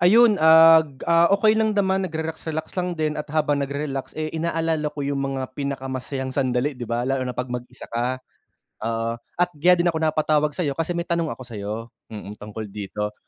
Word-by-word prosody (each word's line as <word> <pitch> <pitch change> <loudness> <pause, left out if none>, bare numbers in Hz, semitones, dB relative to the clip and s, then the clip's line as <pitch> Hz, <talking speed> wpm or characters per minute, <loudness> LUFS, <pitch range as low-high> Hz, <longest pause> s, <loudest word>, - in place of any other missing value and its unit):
Ayun, 220 +3 +6
ag 160 -3 +7
ah 170 0 +5
okey 215 +2 +4
lang 220 -1 +2
naman, 190 -2 +1
nag-relax 160 -2 -4
relax 160 +2 -4
lang 180 -1 -1
din 155 -1 0
at 150 - -3
habang 150 -2 +1
nagre 140 +2 -3
relax, 135 -1 -5
eh, 155 0 -1
inaalala 160 -2 -1
ko 150 - -7
yung 140 0 -1
mga 135 -1 -3
pinakamasayang 135 -1 -4
sandali, 130 +1 0
'di 125 - -5
ba, 120 +1 -1
lalo 135 0 0
na 125 - -3
'pag 125 0 -2
mag-isa 125 +1 -7
ka, 120 +2 -1 0.7
oo. 115 0 -1 0.3
At 180 0 +2
kaya 175 +5 +5
din 175 - +3
ako 165 -2 0
napatawag 150 -1 +2
sa'yo, 145 -3 -2
kasi 165 +1 -1
may 170 0 -2
tanong 170 -2 0
ako - - -9
sa'yo, 105 -3 -5 0.4
mm, 105 -1 -8
tungkol 105 0 -7
dito. 105 +1 -5
150 Hz, 195 wpm, -23 LUFS, 130-165 Hz, 0.7 s, ag